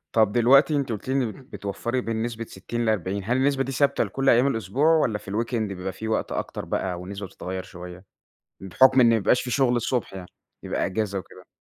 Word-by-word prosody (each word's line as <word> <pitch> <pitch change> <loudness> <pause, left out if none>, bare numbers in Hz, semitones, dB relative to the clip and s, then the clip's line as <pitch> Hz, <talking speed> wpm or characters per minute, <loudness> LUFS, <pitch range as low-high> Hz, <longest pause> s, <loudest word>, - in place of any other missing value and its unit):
طَب 110 -2 +4
دلوقتي 130 +6 +5
أنتِ 140 -4 -1
قُلتِ 110 +2 -5
لي - - +1
إن 125 -5 +1
بتوفّري 120 +1 -4
بين 115 -1 -2
نسبة 115 -1 -4
60 115 +4 -5
ل40. 100 -2 -1
هل 120 +4 +1
النسبة 135 0 +2
دي 135 - -5
ثابتة 140 +1 +2
لكل 135 0 0
أيام 120 +3 +5
الأسبوع 115 +2 -1
والّا 125 -9 +1
في 100 - -10
الweekend 115 +4 -2
بيبقى 95 -4 -3
فيه 110 +4 -6
وقت 110 - -1
أكتر - - -4
بقى 90 -2 -2
والنسبة 100 +2 -7
بتتغيّر 95 0 -6
شوية؟ 90 0 -11 0.6
بحُكم 130 +8 +4
إن 120 - +6
ما 115 - +4
بيبقاش 110 +4 +2
فيه 125 - -5
شغل 125 -1 +2
الصبح 120 +1 -1
يعني، 90 -2 -8 0.3
بيبقى - - -1
أجازة 100 0 -2
وكده. 90 - -12
115 Hz, 205 wpm, -25 LUFS, 100-130 Hz, 0.6 s, إن